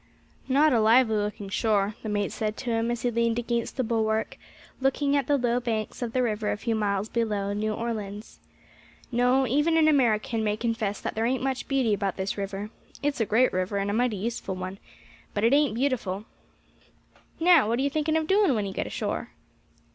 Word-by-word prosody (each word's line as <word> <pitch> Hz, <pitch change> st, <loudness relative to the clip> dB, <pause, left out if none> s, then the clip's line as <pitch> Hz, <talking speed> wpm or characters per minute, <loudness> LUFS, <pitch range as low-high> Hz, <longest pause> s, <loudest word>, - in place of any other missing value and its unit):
"Not 285 Hz, +2 st, +4 dB
a 235 Hz, -, +4 dB
lively 225 Hz, +1 st, +5 dB
looking 205 Hz, -1 st, -2 dB
shore," 205 Hz, 0 st, +1 dB
the 220 Hz, -, -5 dB
mate 205 Hz, -1 st, -1 dB
said 215 Hz, -2 st, -3 dB
to 245 Hz, -, -3 dB
him 225 Hz, 0 st, 0 dB
as 240 Hz, -1 st, -3 dB
he 245 Hz, -, +1 dB
leaned 230 Hz, 0 st, +1 dB
against 235 Hz, -1 st, -2 dB
the 260 Hz, -, +1 dB
bulwark, 220 Hz, -1 st, 0 dB, 0.4 s
looking 280 Hz, +1 st, +1 dB
at 280 Hz, -3 st, +1 dB
the 290 Hz, -, +3 dB
low 245 Hz, -1 st, +1 dB
banks 225 Hz, -2 st, -3 dB
of 240 Hz, -2 st, -2 dB
the 255 Hz, +1 st, +1 dB
river 215 Hz, -2 st, -1 dB
a -, -, -2 dB
few 230 Hz, +2 st, -2 dB
miles 205 Hz, -2 st, 0 dB
below 210 Hz, -4 st, -1 dB
New 215 Hz, +1 st, -1 dB
Orleans. 215 Hz, -2 st, -5 dB, 0.7 s
"No, 250 Hz, +2 st, +3 dB
even 295 Hz, +7 st, +2 dB
an 315 Hz, -1 st, +5 dB
American 230 Hz, -6 st, +2 dB
may 210 Hz, 0 st, 0 dB
confess 225 Hz, -3 st, -2 dB
that -, -, -3 dB
there 225 Hz, +1 st, 0 dB
ain't 260 Hz, +1 st, -1 dB
much 265 Hz, -1 st, -2 dB
beauty 260 Hz, -6 st, +1 dB
about 200 Hz, -2 st, -1 dB
this 190 Hz, 0 st, -2 dB
river. 200 Hz, +1 st, -5 dB, 0.3 s
It's 285 Hz, -4 st, 0 dB
a 220 Hz, -, +1 dB
great 245 Hz, +4 st, +3 dB
river, 185 Hz, +2 st, -1 dB
and 200 Hz, 0 st, -1 dB
a -, -, -2 dB
mighty 235 Hz, -1 st, +1 dB
useful 205 Hz, -2 st, -3 dB
one, 185 Hz, +1 st, -6 dB, 0.6 s
but 205 Hz, -, 0 dB
it 230 Hz, +3 st, +4 dB
ain't 285 Hz, -5 st, +3 dB
beautiful. 225 Hz, -6 st, -1 dB, 1.1 s
Now, 330 Hz, -7 st, +5 dB
what 230 Hz, +2 st, +1 dB
are 265 Hz, -, 0 dB
you 280 Hz, -, +2 dB
thinking 310 Hz, +2 st, +1 dB
of 320 Hz, -, 0 dB
doing 385 Hz, -5 st, +3 dB
when 210 Hz, -2 st, -1 dB
you 195 Hz, -, -5 dB
get -, -, -3 dB
ashore?" -, -, -3 dB
230 Hz, 205 wpm, -26 LUFS, 210-255 Hz, 1.1 s, lively